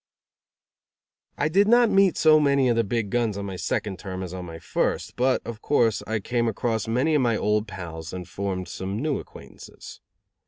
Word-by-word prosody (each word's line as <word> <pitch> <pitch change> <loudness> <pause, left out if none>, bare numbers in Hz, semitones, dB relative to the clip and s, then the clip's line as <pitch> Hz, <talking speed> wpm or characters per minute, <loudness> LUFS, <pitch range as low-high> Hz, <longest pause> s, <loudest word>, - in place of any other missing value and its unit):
I 150 - +1
did 195 +6 +3
not 235 0 +5
meet 195 -3 +4
so 155 -1 +6
many 140 -3 +3
of 120 - +2
the 115 - +2
big 110 -1 -2
guns 115 -4 0
on 100 - -4
my 95 -1 -5
second 95 +1 -3
term 95 -1 -5
as 90 -1 -7
on 90 -1 -6
my 80 -1 -8
first; - - -2
but, 130 +1 +1
of 115 -2 -7
course, 115 -7 +2
I 110 0 -1
came 120 +3 -1
across 110 0 -1
many 130 +8 +1
of 150 - +3
my 115 -3 +2
old 105 +1 0
pals 85 -4 -7
and 90 -1 -7
formed 95 -2 -4
some 95 +2 -5
new 150 +1 -1
acquaintances. - - -12
110 Hz, 195 wpm, -25 LUFS, 95-135 Hz, -, so